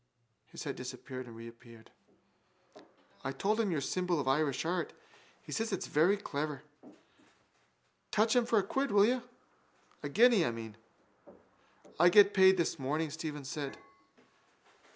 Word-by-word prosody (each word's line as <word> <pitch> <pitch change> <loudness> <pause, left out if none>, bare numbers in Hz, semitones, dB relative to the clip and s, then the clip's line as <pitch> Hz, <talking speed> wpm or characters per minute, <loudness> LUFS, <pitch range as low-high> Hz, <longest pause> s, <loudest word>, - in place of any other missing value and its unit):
His - - -9
head - - -4
disappeared 130 0 -7
and 115 - -11
reappeared. 115 0 -13 1.3
—I 135 - -2
told 210 +10 0
him 220 -3 +1
your 160 -5 -1
symbol 180 +3 -1
of 135 - -3
Irish 140 +1 +1
art. 175 +1 -2 0.5
He - - -11
says 225 0 -2
it's 195 - -2
very 175 +7 +3
clever. 150 -6 -4 1.5
Touch 220 +2 +2
him 245 -1 +3
for 225 - +2
a 200 - +3
quid, 270 +8 -1
will 205 -1 +5
you? 250 +2 +1 0.8
A 145 - -4
guinea, 225 - +5
I - - +1
mean. 115 -2 -7 1.2
—I 175 - +7
get 200 +2 +6
paid 190 -1 +6
this 170 -2 -1
morning, 150 +4 -2
Stephen 150 -2 -6
said. 140 0 -5
160 Hz, 145 wpm, -32 LUFS, 135-200 Hz, 1.5 s, I